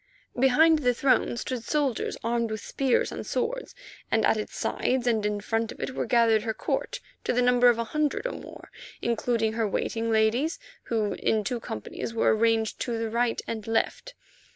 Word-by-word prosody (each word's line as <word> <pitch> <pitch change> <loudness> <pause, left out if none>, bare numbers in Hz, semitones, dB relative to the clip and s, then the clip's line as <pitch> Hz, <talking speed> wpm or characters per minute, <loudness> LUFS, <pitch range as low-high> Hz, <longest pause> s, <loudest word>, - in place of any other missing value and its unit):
Behind 300 +5 +5
the 250 -4 +2
throne 255 -2 +2
stood 245 -1 -4
soldiers 280 -3 -1
armed 235 0 0
with 215 -1 -4
spears 265 -3 +1
and - - -5
swords, - - -3 0.3
and 220 -1 +2
at - - +4
its 215 - -5
sides 255 -1 0
and 225 -3 +2
in 210 0 -2
front 225 +1 -1
of - - -11
it 265 - -4
were - - -2
gathered 230 -3 +4
her 220 0 -3
court - - -2 0.2
to - - 0
the 250 - +2
number 245 0 +5
of 235 - +3
a 230 - 0
hundred 300 - -1
or - - -1
more, - - -11 0.3
including 230 -1 0
her 225 -1 0
waiting 225 +3 -2
ladies, 225 +8 +2 0.3
who 220 -3 0
in 220 -1 +1
two 240 +4 -2
companies 225 - -6
were 225 - +3
arranged 225 0 +1
to 235 -2 -2
the 225 -1 -3
right 235 0 0
and 220 -2 -5
left. 365 - -1
230 Hz, 190 wpm, -27 LUFS, 220-255 Hz, 0.3 s, Behind